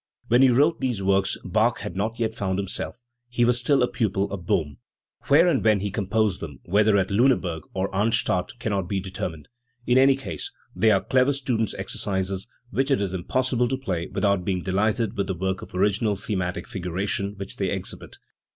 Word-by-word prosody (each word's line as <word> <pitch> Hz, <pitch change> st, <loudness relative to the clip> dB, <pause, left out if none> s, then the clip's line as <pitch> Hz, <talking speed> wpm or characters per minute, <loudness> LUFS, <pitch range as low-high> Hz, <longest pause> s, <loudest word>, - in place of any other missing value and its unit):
When 120 Hz, +2 st, +5 dB
he 135 Hz, -, +7 dB
wrote 145 Hz, +7 st, +3 dB
these 120 Hz, -7 st, -1 dB
works 95 Hz, 0 st, +2 dB
Bach -, -, +1 dB
had 85 Hz, -, -6 dB
not 110 Hz, +4 st, -2 dB
yet 110 Hz, -1 st, 0 dB
found 95 Hz, -4 st, -2 dB
himself; 100 Hz, +5 st, -4 dB, 0.3 s
he 120 Hz, -1 st, +2 dB
was 120 Hz, 0 st, +2 dB
still 135 Hz, +1 st, +3 dB
a -, -, +3 dB
pupil 100 Hz, -5 st, -1 dB
of 90 Hz, -3 st, -6 dB
Bohm. 75 Hz, -4 st, 0 dB, 0.5 s
Where 155 Hz, +5 st, +6 dB
and 165 Hz, -, +2 dB
when 110 Hz, -1 st, +4 dB
he 100 Hz, 0 st, -2 dB
composed 105 Hz, -1 st, 0 dB
them, 75 Hz, -6 st, -7 dB
whether 105 Hz, +3 st, +3 dB
at 95 Hz, +1 st, 0 dB
Liineburg 100 Hz, -, +2 dB
or 95 Hz, 0 st, 0 dB
at 100 Hz, -, -15 dB
Arnstadt, 100 Hz, 0 st, 0 dB
cannot 100 Hz, -7 st, -2 dB
be 100 Hz, -, 0 dB
determined. 90 Hz, -5 st, -5 dB, 0.4 s
In 125 Hz, +1 st, +4 dB
any 135 Hz, 0 st, +6 dB
case 135 Hz, -, -6 dB, 0.2 s
they 105 Hz, +5 st, +4 dB
are 100 Hz, -3 st, +4 dB
clever 130 Hz, +2 st, +2 dB
student's 120 Hz, -6 st, -1 dB
exercises, 95 Hz, 0 st, -3 dB, 0.2 s
which 135 Hz, +2 st, 0 dB
it 135 Hz, -, +3 dB
is 100 Hz, -2 st, -2 dB
impossible 125 Hz, +6 st, 0 dB
to 130 Hz, +2 st, -1 dB
play 90 Hz, -10 st, -3 dB
without 100 Hz, -3 st, +1 dB
being 90 Hz, -1 st, -1 dB
delighted 105 Hz, +4 st, 0 dB
with 100 Hz, -1 st, -1 dB
the 95 Hz, -, -2 dB
power 95 Hz, +2 st, 0 dB
of -, -, -11 dB
original 100 Hz, +2 st, +2 dB
thematic 95 Hz, -2 st, -3 dB
figuration 100 Hz, -1 st, -3 dB
which 100 Hz, 0 st, -7 dB
they 95 Hz, -2 st, 0 dB
exhibit. 95 Hz, -1 st, -4 dB
100 Hz, 195 wpm, -25 LUFS, 95-120 Hz, 0.5 s, he